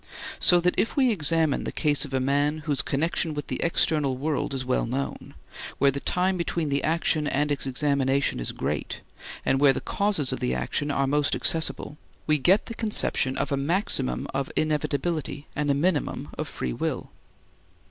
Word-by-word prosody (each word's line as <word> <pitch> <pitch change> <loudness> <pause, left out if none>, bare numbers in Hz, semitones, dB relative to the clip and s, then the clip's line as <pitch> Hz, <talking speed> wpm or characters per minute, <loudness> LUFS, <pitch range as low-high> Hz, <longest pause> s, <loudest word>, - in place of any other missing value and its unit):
So 175 - +6
that 180 +1 +2
if - - 0
we 260 -3 +4
examine 160 -5 +3
the - - -4
case 150 -2 +1
of 135 - -10
a - - +2
man 145 +3 0
whose 145 -4 +1
connection 155 +2 -1
with 145 - -4
the - - -4
external 150 -5 +2
world 150 +2 -2
is 130 -1 -4
well 125 -2 0
known, 135 +3 -4 0.4
where 140 0 +4
the 140 - -4
time 185 +5 0
between 170 -2 -2
the 140 0 0
action 155 -1 +1
and 145 +1 0
its 140 -1 -1
examination 140 - +1
is - - -3
great, - - -4 0.4
and 135 - +2
where 140 -1 +5
the - - -3
causes 200 -10 0
of - - -4
the 65 +1 -1
action 65 - -2
are 140 -1 +1
most 145 +1 +1
accessible, 160 -2 -2 0.3
we 155 -1 +2
get 185 +9 +3
the 230 - -6
conception 210 -12 +1
of 140 0 -2
a 140 - +1
maximum 140 - -1
of 135 0 -2
inevitability 155 0 -1
and 150 -1 -1
a 140 - +3
minimum 155 +1 -1
of - - -4
free 60 - -4
will. - - -3
145 Hz, 185 wpm, -26 LUFS, 135-165 Hz, 0.4 s, So